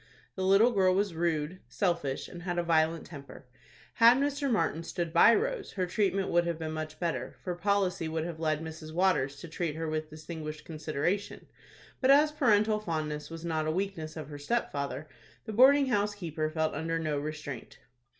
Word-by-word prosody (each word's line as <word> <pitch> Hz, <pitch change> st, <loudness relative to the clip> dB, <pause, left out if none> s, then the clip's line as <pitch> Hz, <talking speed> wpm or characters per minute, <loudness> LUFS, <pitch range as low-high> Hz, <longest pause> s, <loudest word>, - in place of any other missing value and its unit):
The 190 Hz, -, -6 dB
little 195 Hz, +6 st, +5 dB
girl 190 Hz, -4 st, +3 dB
was 200 Hz, -2 st, +1 dB
rude, 165 Hz, +1 st, -1 dB
selfish, 170 Hz, -9 st, -1 dB
and 175 Hz, -, -10 dB
had 175 Hz, -1 st, -3 dB
a 175 Hz, -, +1 dB
violent 165 Hz, -1 st, +2 dB
temper. 140 Hz, -3 st, -11 dB, 0.5 s
Had 235 Hz, +2 st, +7 dB
Mr. 285 Hz, 0 st, 0 dB
Martin 185 Hz, -7 st, +1 dB
stood 170 Hz, -1 st, -4 dB
by 205 Hz, +7 st, +7 dB
Rose, 485 Hz, -1 st, -2 dB
her 185 Hz, -2 st, -1 dB
treatment 195 Hz, 0 st, 0 dB
would 175 Hz, 0 st, +2 dB
have 170 Hz, -2 st, -1 dB
been 160 Hz, -1 st, -4 dB
much 155 Hz, 0 st, -5 dB
better, 170 Hz, -2 st, -2 dB
for 180 Hz, -, -2 dB
policy 185 Hz, -2 st, 0 dB
would 160 Hz, 0 st, -2 dB
have 170 Hz, -2 st, -6 dB
led 155 Hz, -1 st, 0 dB
Mrs. 155 Hz, -1 st, -8 dB
Waters 165 Hz, -6 st, +1 dB
to -, -, -7 dB
treat 160 Hz, -1 st, -3 dB
her 165 Hz, 0 st, -3 dB
with 155 Hz, 0 st, -3 dB
distinguished 155 Hz, 0 st, -7 dB
consideration; 155 Hz, +5 st, -2 dB, 0.6 s
but 260 Hz, -, +3 dB
as 295 Hz, +2 st, +6 dB
parental 215 Hz, -7 st, +3 dB
fondness 155 Hz, -6 st, -3 dB
was 165 Hz, 0 st, -8 dB
not 160 Hz, -2 st, -1 dB
a -, -, +1 dB
weakness 170 Hz, -3 st, -3 dB
of 155 Hz, -2 st, -7 dB
her 145 Hz, -1 st, -8 dB
stepfather, 145 Hz, -, -2 dB, 0.4 s
the 220 Hz, -, -5 dB
boarding 275 Hz, +5 st, +6 dB
house 205 Hz, -4 st, 0 dB
keeper 160 Hz, -5 st, -3 dB
felt 160 Hz, 0 st, -1 dB
under 165 Hz, +1 st, -2 dB
no 155 Hz, -3 st, -1 dB
restraint. 150 Hz, -4 st, -6 dB
170 Hz, 185 wpm, -30 LUFS, 155-200 Hz, 0.6 s, Had